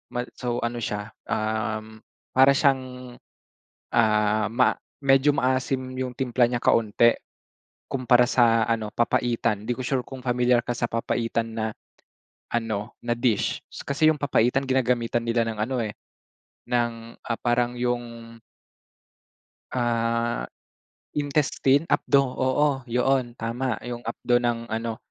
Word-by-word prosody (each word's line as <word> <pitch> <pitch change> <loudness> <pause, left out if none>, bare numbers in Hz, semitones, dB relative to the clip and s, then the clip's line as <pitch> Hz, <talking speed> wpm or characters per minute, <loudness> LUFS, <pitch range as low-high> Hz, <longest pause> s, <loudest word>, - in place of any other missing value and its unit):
Ma 120 - 0
so, 120 -1 -3
ano 120 0 -2
siya, 105 -1 -4 0.2
uhm, 110 0 -2 0.3
para 135 +1 +6
siyang, 130 -3 0 0.8
ah, 105 -1 +2
ma 125 +2 +3 0.2
medyo 135 +1 +4
maasim 130 -1 0
yung 130 -1 -3
timpla 125 -2 +2
niya 120 - 0
kaunti 115 +1 +3 0.8
kumpara 125 -2 +3
sa 115 -2 +4
ano, 110 -2 -1
papaitan. 115 -3 0
Hindi 120 - 0
ko 130 - -5
sure 130 0 -1
kung 130 -2 -9
pamilyar 125 -1 +2
ka 120 - -6
sa 120 0 0
papaitan 115 0 -1
na 110 0 -2 0.9
ano, 110 -1 -3
na 120 0 -1
dish. 115 -4 0
Kasi 155 +3 +1
yung 150 - -4
papaitan 135 -1 +1
ginagamitan 120 -2 +1
nila 115 -1 +1
ng 110 -1 -4
ano, 125 +3 -1
eh, 105 -3 -3 0.7
ng, 115 -1 -2
ah, 115 - -3
parang 120 0 0
'yong 120 -1 -3 1.4
ah, 115 - 0 0.7
intestine, 145 0 +1
apdo 140 -4 +3
oo, 130 +3 +1 0.2
yoon, 125 0 +1
tama! 115 +1 -2
'Yong 120 -1 -5
apdo 120 +1 0
ng 120 -1 -1
ano, 115 0 -2
120 Hz, 125 wpm, -25 LUFS, 115-130 Hz, 1.4 s, para